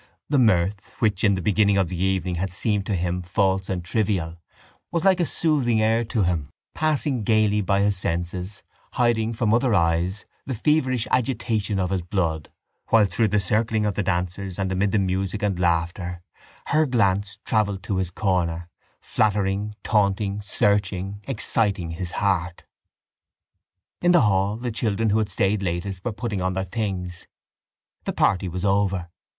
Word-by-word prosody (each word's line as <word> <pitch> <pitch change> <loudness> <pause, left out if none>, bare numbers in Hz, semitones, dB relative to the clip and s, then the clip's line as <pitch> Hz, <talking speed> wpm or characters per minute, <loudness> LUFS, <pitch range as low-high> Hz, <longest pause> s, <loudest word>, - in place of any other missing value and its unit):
The 145 -1 +3
mirth, 95 -3 +1
which 105 -4 0
in 100 -2 +4
the 90 - -4
beginning 100 0 +3
of 95 -4 +1
the 90 -1 -4
evening 95 -2 0
had 90 +2 -2
seemed 100 +2 -1
to 100 - 0
him 90 +1 -1
false 95 +1 0
and 90 -2 -3
trivial, 90 -5 -1 0.5
was 170 +1 -1
like 190 -1 +5
a 170 - +1
soothing 135 -9 +2
air 110 +2 +2
to 110 -2 0
him, 85 -5 -1 0.2
passing 150 -6 0
gaily 105 -1 +3
by 100 0 +1
his 100 -1 +2
senses, 90 +3 -3 0.3
hiding 115 -2 +1
from 110 -2 0
other 120 -1 +3
eyes 85 +3 +1 0.2
the 130 - -4
feverish 130 -2 +1
agitation 115 -5 0
of 90 -1 -1
his 95 -2 0
blood 85 -4 -2 0.4
while 110 -2 +5
through 100 +4 +1
the 105 +1 +2
circling 110 +3 0
of 105 - 0
the 105 - -1
dancers 90 0 -2
and 95 -1 -1
amid 95 +2 +1
the - - +2
music 95 +2 -1
and 100 -3 0
laughter 85 +1 -1 0.5
her 155 +1 +3
glance 100 -4 +1
travelled 100 -3 0
to 95 0 -2
his 95 -2 -1
corner, 85 -3 -1 0.3
flattering, 105 0 0
taunting, 100 -1 +1
searching, 100 -1 0
exciting 105 -8 0
his 85 +1 -5
heart. 90 -3 -1 1.4
In 175 0 +4
the 175 - +6
hall 100 -1 +2
the 120 0 -3
children 110 -1 0
who 110 - +3
had 110 -1 -1
stayed 100 +2 +1
latest 90 +1 -3
were 120 - -1
putting 105 -2 -3
on 95 0 0
their 95 +1 -1
things: 90 -3 -4 0.8
the - - -2
party 95 0 +2
was 90 +2 -4
over. 95 -3 +1
100 Hz, 165 wpm, -24 LUFS, 90-110 Hz, 1.4 s, the